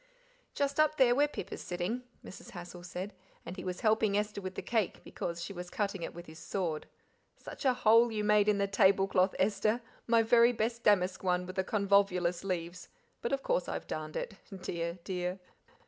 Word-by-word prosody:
"Just 280 +1 0
up 310 0 +4
there 250 -3 +5
where 290 +4 +4
Pip 295 - -7
is - - -6
sitting," 180 +8 -3 0.2
Mrs. - - -10
Hassal 175 -1 -9
said, 185 +3 -6 0.3
"and 175 - -6
he - - -7
was 180 -1 -4
helping 215 -2 +3
Esther 210 -1 -2
with 185 -1 -6
the - - -5
cake, 225 -6 -1
because 170 0 -5
she 200 - -6
was 180 -1 -7
cutting 200 -2 -2
it - - -5
with 175 0 -8
his 160 0 -12
sword. 170 -6 -3 0.5
Such - - -9
a 260 - +5
hole 230 0 +5
you 210 -1 -2
made 210 0 +4
in 210 - +3
the 200 - +2
table 195 0 +4
cloth, 185 0 +2
Esther, 215 +3 +1 0.3
my 230 -1 +5
very 235 +1 +5
best 230 +1 -1
damask 190 -4 +2
one 180 -1 +1
with 185 +1 -8
the 190 - +1
convolvulus 195 -4 +2
leaves, 180 -1 -4 0.3
but, 235 - -2
of 275 0 -1
course, - - 0
I've - - -4
darned - - -5
it - - -5 0.3
dear, 170 0 -3
dear!" 180 0 -3
200 Hz, 200 wpm, -32 LUFS, 180-225 Hz, 0.5 s, there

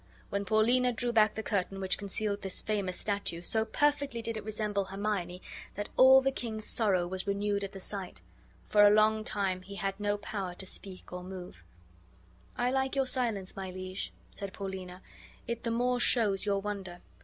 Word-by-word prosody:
When 200 0 -1
Paulina 240 +4 +3
drew 240 +1 0
back 215 -2 +4
the 220 - -3
curtain 195 -2 -1
which 190 -1 +1
concealed 205 0 -2
this 190 -1 -2
famous 200 -4 -1
statue, 200 -5 -1
so 220 +4 +1
perfectly 280 -2 +1
did 230 -1 -3
it 215 - -5
resemble 210 -2 -1
Hermione 195 -2 -3 0.3
that 205 +1 -4
all 265 +1 +8
the 270 0 +2
king's 220 -4 -4
sorrow 195 -6 +1
was 185 +2 -4
renewed 200 0 0
at 195 - -4
the 195 - -8
sight; 190 -1 -5 0.4
for 210 - +4
a 205 - +9
long 215 +1 +4
time 195 -3 -1
he 200 +2 -9
had 195 +1 -2
no 205 0 0
power 200 -3 -4
to 190 - -5
speak 190 -1 -7
or 180 0 -5
move. 180 - -9 0.9
"I 245 +1 +1
like 265 +1 0
your 270 -1 +2
silence, 230 -7 -1
my 190 -1 -5
liege," 185 +1 -4 0.2
said 200 -2 -5
Paulina; 190 -2 -6 0.4
"it 235 0 -3
the 230 - -1
more 245 +2 +1
shows 210 -5 +4
your 200 -1 +2
wonder. 195 -4 -5
205 Hz, 185 wpm, -31 LUFS, 190-220 Hz, 0.9 s, a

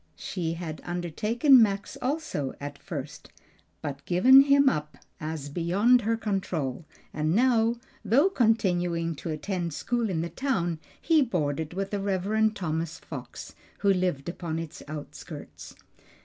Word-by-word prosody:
She 165 -3 -3
had 165 -2 -6
undertaken 215 - +3
Max 200 -2 0
also 260 - -2
at 145 0 -7
first, - - -7 0.5
but 145 0 -5
given 255 +10 +8
him 280 0 +5
up 150 - 0 0.2
as 155 -2 -4
beyond 190 - +3
her 225 +1 0
control; 175 - -2 0.3
and 155 +2 0
now, 235 -1 +3 0.3
though 245 - +4
continuing 180 - +1
to 165 - -6
attend 170 0 -3
school 240 -2 -1
in 165 -4 -1
the 170 - -3
town, 175 - -1 0.2
he 320 -2 +3
boarded 160 - -1
with 195 0 -3
the 205 - -1
Rev. 200 +3 +1
Thomas 165 -4 -3
Fox, - - -9 0.3
who 200 -1 +4
lived 180 -7 -1
upon 170 -2 -4
its 165 -2 -6
outskirts. 150 -1 -9
180 Hz, 135 wpm, -27 LUFS, 160-225 Hz, 0.5 s, given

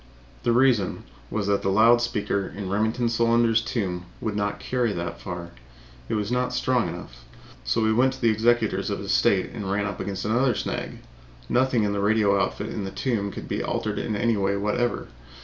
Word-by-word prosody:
The 120 - +1
reason 120 -6 +2 0.3
was 105 -2 -2
that 100 0 +1
the 95 - 0
loud 115 +4 +5
speaker 105 -4 -1
in 95 -2 -4
Remington 110 +4 +1
Solander's 115 -1 +3
tomb 95 -7 -3
would 110 -2 -3
not 105 0 -1
carry 125 -3 0
that 85 -1 -5
far; 85 -2 -6 0.6
it - - 0
was 105 +1 -2
not 125 0 0
strong 125 -4 +1
enough. - - -9 0.4
So 65 - +1
we 110 0 +3
went 130 +3 +3
to - - -11
the 115 - +5
executors 110 -3 +1
of 100 - -1
his 100 -1 -4
estate 95 -1 +2
and 100 -3 -4
ran 100 0 0
up 100 -1 -4
against 100 -1 -4
another 120 +3 +2
snag - - -4 0.5
nothing 125 -2 +2
in 100 -1 0
the 100 - -1
radio 100 -1 +3
outfit 100 +2 -2
in 105 - -4
the 95 - -4
tomb 100 0 -1
could - - -8
be - - -2
altered - - -2
in 110 - -2
any 115 +2 +2
way 100 0 +1
whatever. 105 +4 -1
105 Hz, 200 wpm, -25 LUFS, 100-120 Hz, 0.6 s, loud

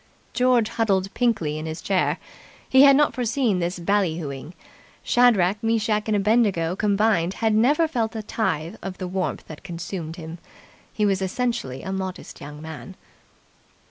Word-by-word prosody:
George 245 -2 +3
huddled 195 -4 0
pinkly 170 -12 0
in 155 - -5
his 160 0 -5
chair. 190 -2 0 0.5
He 265 - +6
had 275 -1 +8
not 295 +1 +3
foreseen 240 -4 0
this 175 +1 -2
bally 180 -2 +1
hooing. 145 0 -7 0.5
Shadrach, 210 -5 +3
Meschach 220 -2 +1
and 215 - +1
Abednego 200 -5 +2
combined 200 -3 +1
had 225 -1 +1
never 285 +9 +3
felt 230 -7 -2
a 220 - -4
tithe 190 -4 -2
of 190 -1 -6
the 185 - -4
warmth 185 0 -2
that 155 - -10
consumed 170 -2 -6
him. 165 -1 -8 0.5
He 210 - 0
was 195 -1 +1
essentially 195 - -2
a 190 - -4
modest 190 -1 -6
young 150 +2 -9
man. 160 +4 -9
195 Hz, 155 wpm, -24 LUFS, 170-225 Hz, 0.5 s, had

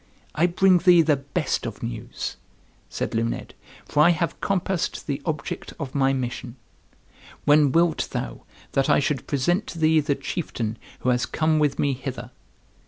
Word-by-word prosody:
"I 165 +3 +3
bring 180 +1 +4
thee 175 -1 +6
the 155 -2 +3
best 140 -1 -2
of 115 - -7
news," 115 0 -5 0.5
said - - -3
Luned, 115 +1 -2 0.3
"for 150 - +2
I 160 - +7
have 170 -1 0
compassed 190 -2 -1
the 140 -1 -3
object 150 -3 -4
of 135 -4 -5
my 135 -1 +3
mission. 125 -2 -4 0.9
When 145 -1 +5
wilt 165 0 +2
thou - - -4 0.3
that 135 - +1
I - - +5
should 145 -1 -1
present 175 +9 +1
to - - -7
thee 160 0 +4
the 145 -1 0
chieftain 135 - -4 0.2
who 130 - +1
has 125 -1 +1
come 155 -1 +1
with 145 -2 +1
me 140 -1 +1
hither?" 130 0 -6
145 Hz, 165 wpm, -24 LUFS, 130-165 Hz, 0.9 s, I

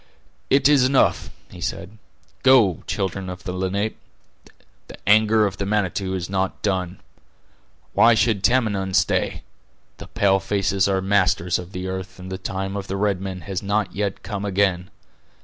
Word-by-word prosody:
"It 135 0 +4
is 145 -3 +5
enough," 130 +1 +2 0.2
he - - -11
said. 105 +6 -5 0.4
"Go, 120 - +4
children 95 0 -3
of 90 -1 -8
the 90 - -4
Lenape, 95 +4 -2 0.9
the - - -11
anger 110 +1 +5
of 100 -2 -3
the 100 - -3
Manitou 95 -2 -1
is 90 -2 -4
not 95 -1 -2
done. 95 -2 -1 0.9
Why 115 0 +5
should 110 -3 +1
Tamenund 100 -7 +1
stay? 85 - +1 0.5
The - - -10
pale 95 -1 +2
faces 95 0 0
are 95 -1 +1
masters 95 -3 +1
of 90 +1 -9
the 90 -1 -5
earth, 95 0 -6
and 95 0 -9
the 95 - -5
time 95 +1 -4
of 100 -1 -5
the 95 - -3
red 100 -2 0
men 95 -1 -5
has 95 -1 -4
not 100 -1 -1
yet 100 -1 -3
come 100 -2 -5
again. 95 -2 0
95 Hz, 165 wpm, -22 LUFS, 95-105 Hz, 0.9 s, is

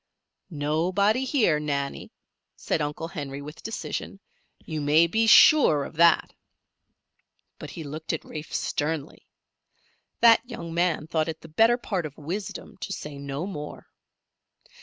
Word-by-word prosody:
"Nobody 180 - +1
here, 225 - +2
Nannie," 140 -2 -3 0.4
said - - -2
Uncle 150 +2 -3
Henry, 140 -6 -6
with 150 +2 -10
decision. 225 -2 -5 0.5
"You 155 -2 -4
may 150 +3 +5
be 220 +6 +1
sure 220 - +7
of - - -9
that." 170 0 +4 1.3
But - - -8
he 165 - -7
looked 155 +2 -5
at 160 - -4
Rafe 155 0 -8
sternly. 150 0 -3 0.9
That 230 -1 +7
young 170 -10 -8
man 170 -2 0
thought 160 0 -1
it 160 0 -6
the - - -11
better 225 +9 +4
part 190 -9 -3
of 145 - -16
wisdom 190 +6 -6
to 195 - -6
say 150 -6 -6
no 140 +3 -4
more. 150 -7 -8
160 Hz, 140 wpm, -26 LUFS, 150-195 Hz, 1.3 s, sure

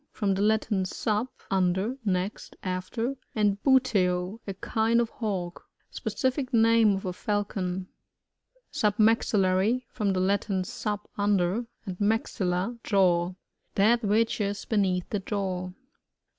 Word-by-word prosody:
— - - -52
From 200 -2 0
the 190 - -1
Latin, 215 -1 +2
stf6, 210 +5 -1 0.2
un 185 -2 +3
der, 205 +7 -2
next, 190 0 -2
after, 190 +7 -2 0.2
and 205 -2 +1
buteo, 200 -7 +2
a 195 - -4
kind 225 +4 +1
of 235 -1 0
Hawk. 185 -6 -4 0.2
Specific 260 0 -2
name 225 -3 +5
of 195 - -5
a 180 - -2
Falcon. 190 -2 -2 0.9
Submaxillary 210 +1 +2
— - - -48
From 205 -4 0
the 185 - 0
Latin, 195 0 +1
su^, 210 +3 -3 0.2
under, 205 +2 +1 0.2
and 185 -3 -6
maxtUa^ 205 0 0
jaw. 180 -3 +2 0.4
That 225 +4 +4
which 220 +2 +2
is 200 0 -2
beneath 190 -5 +1
the 210 - 0
jaw. 185 -2 -3
205 Hz, 130 wpm, -27 LUFS, 185-225 Hz, 0.9 s, name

